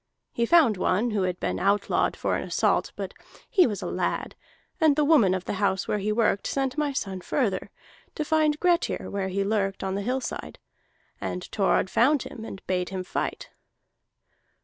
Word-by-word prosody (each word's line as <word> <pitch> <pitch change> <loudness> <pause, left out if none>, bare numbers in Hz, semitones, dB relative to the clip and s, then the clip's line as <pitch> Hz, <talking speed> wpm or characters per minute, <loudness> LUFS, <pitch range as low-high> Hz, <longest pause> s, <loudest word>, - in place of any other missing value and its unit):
He 235 0 0
found 295 - +5
one 205 +6 +1
who 210 -2 0
had 180 -1 -1
been - - -2
outlawed 200 +1 +1
for - - 0
an - - -2
assault, - - +1
but - - -5 0.3
he 375 - +4
was 210 -4 -4
a - - -4
lad; - - -2 0.5
and 315 -4 +4
the 300 0 +2
woman 235 - +5
of 185 - -4
the - - -2
house 195 -1 +1
where 210 - 0
he 210 +2 -1
worked 215 -2 +1
sent 270 -2 -1
my 300 -1 0
son 195 -9 -3
further, 200 -4 -1 0.5
to 305 - -2
find 305 -1 +2
Grettir 350 -1 +1
where 195 -1 -2
he 195 +1 -1
lurked 195 -1 -1
on 190 0 -2
the 200 - -2
hillside. 255 +5 -3 0.6
And 180 - -3
Thorod 195 -2 +2
found 275 +4 +3
him 220 - -9
and 195 -3 -9
bade 180 -1 -1
him 190 -1 -4
fight. - - -4
210 Hz, 185 wpm, -26 LUFS, 195-285 Hz, 0.6 s, found